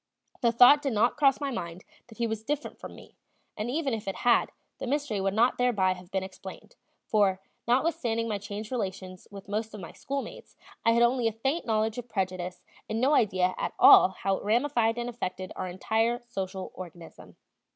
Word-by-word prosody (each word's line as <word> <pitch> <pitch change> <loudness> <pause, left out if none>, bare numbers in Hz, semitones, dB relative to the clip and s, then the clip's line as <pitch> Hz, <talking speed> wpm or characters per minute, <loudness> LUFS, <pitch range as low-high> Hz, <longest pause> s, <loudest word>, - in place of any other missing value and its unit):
The 235 - +3
thought 250 +5 +7
did 275 -4 -1
not 220 +3 +2
cross 275 -3 +3
my 280 -2 -2
mind 175 -5 -6 0.2
that 225 -3 -15
he 235 - 0
was 220 -1 -3
different 295 +5 -4
from - - -9
me, - - -15 0.4
and 215 +3 -4
even 280 -1 -1
if 215 -3 -4
it 195 - -2
had, 240 -1 +4 0.3
the - - -5
mystery 275 -7 -1
would 195 +1 -1
not 240 +3 +3
thereby 210 -7 +2
have 180 -1 -13
been 190 -1 -2
explained; 190 - -10 0.3
for, 200 -3 +2 0.3
notwithstanding 235 -3 +1
my 210 -2 -2
changed 210 +2 -7
relations 190 -5 -5
with 195 -1 -11
most 215 +2 -3
of - - -8
my 175 - -8
schoolmates, 275 0 -6 0.3
I 230 - +4
had 235 +1 +4
only 240 0 +2
a - - +1
faint 270 +9 -2
knowledge 220 +1 0
of 245 0 -9
prejudice 185 -3 -3 0.3
and 220 +1 -1
no 265 +5 +3
idea 185 -7 +2
at - - -2
all - - +8
how 190 +1 -2
it - - -9
ramified 235 +1 +1
and 240 0 -3
affected 185 -6 -5
our 185 - -4
entire 220 +6 0
social 190 -4 -5
organism. 175 -2 -11
220 Hz, 195 wpm, -28 LUFS, 190-245 Hz, 0.4 s, all